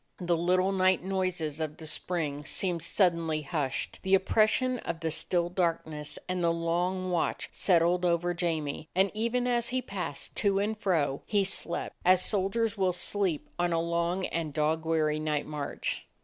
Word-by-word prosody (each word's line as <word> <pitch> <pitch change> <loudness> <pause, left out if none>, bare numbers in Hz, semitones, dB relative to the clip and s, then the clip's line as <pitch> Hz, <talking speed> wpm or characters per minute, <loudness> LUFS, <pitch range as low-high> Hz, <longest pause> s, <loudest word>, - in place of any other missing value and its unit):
The 175 -2 0
little 185 +3 +2
night 185 -2 +3
noises 185 -5 -2
of 155 -1 -3
the 160 - -9
spring 155 -2 -3
seemed 175 +2 0
suddenly 165 -3 +1
hushed. 145 -3 -2
The 190 0 +4
oppres 215 +3 +3
sion 255 +2 0
of 170 -1 -4
the 160 -1 -1
still 170 +2 +1
darkness 165 -4 -2
and 180 -1 -1
the 170 - +3
long 175 +3 -1
watch 170 -2 -1
settled 175 0 +2
over 175 0 +1
Jamie, 160 -3 -2
and 190 +1 +3
even 235 +3 0
as 240 -1 +1
he 255 - 0
passed 190 - -5
to 200 -1 +2
and 210 +2 0
fro, 165 -10 0
he 205 -2 +2
slept, 190 -3 -2
as 185 0 +5
soldiers 210 +3 0
will 190 -3 +1
sleep 180 -2 0
on 175 -1 +1
a 165 - +2
long 170 +2 0
and 160 -3 -3
dog 160 +1 +1
weary 155 -2 +1
night 155 -1 -1
march. 150 -2 -4
175 Hz, 170 wpm, -29 LUFS, 160-190 Hz, -, as